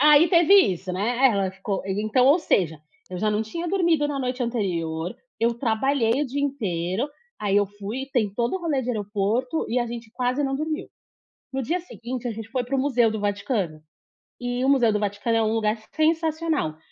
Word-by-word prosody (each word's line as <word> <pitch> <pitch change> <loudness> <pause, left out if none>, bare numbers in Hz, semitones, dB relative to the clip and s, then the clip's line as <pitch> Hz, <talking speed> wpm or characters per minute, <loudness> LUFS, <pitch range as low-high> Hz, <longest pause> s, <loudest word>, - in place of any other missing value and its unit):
Ai 300 +3 +7
teve 345 +1 +5
isso, 185 - +3
né, 235 +8 +2
é - - +5
ela 195 -3 0
ficou 190 +1 -4
e 195 +1 -2
então, 250 +4 +3
ou 295 +6 +6
seja, 160 - +1 0.3
eu 180 - -4
já 215 +1 +1
não 210 +1 +1
tinha 335 +10 -4
dormido 335 -6 +2
na 285 -1 -3
noite 250 0 -2
anterior, 175 -8 -2 0.3
eu 235 +1 +2
trabalhei 235 +2 +1
o - - -1
dia 280 +3 -2
inteiro, 205 - -1 0.3
aí 205 -1 +1
eu 205 - +4
fui 205 +7 -6
tem 220 -5 +1
todo 235 - -1
o - - -7
rolê 310 -6 0
de 250 - -2
aeroporto, 215 +6 -1
e 250 - +1
a 240 - 0
gente 230 -1 -7
quase 255 +3 0
não 270 0 -1
dormiu. 310 +4 -3 0.6
No 265 0 -2
dia 335 +9 -1
seguinte 250 -6 -6
a - - -1
gente 220 0 -7
foi 250 +2 -1
para 255 +3 -2
o - - +1
museu 245 -5 +3
do 220 - -3
Vaticano, 200 - -2 0.6
e 245 +1 -2
o - - +2
museu 245 -6 +4
do 210 - +1
Vaticano 205 +3 -1
é 225 - +3
um 220 0 +1
lugar 220 -1 +1 0.2
sensacional, 315 - +1
235 Hz, 210 wpm, -24 LUFS, 205-275 Hz, 0.6 s, Ai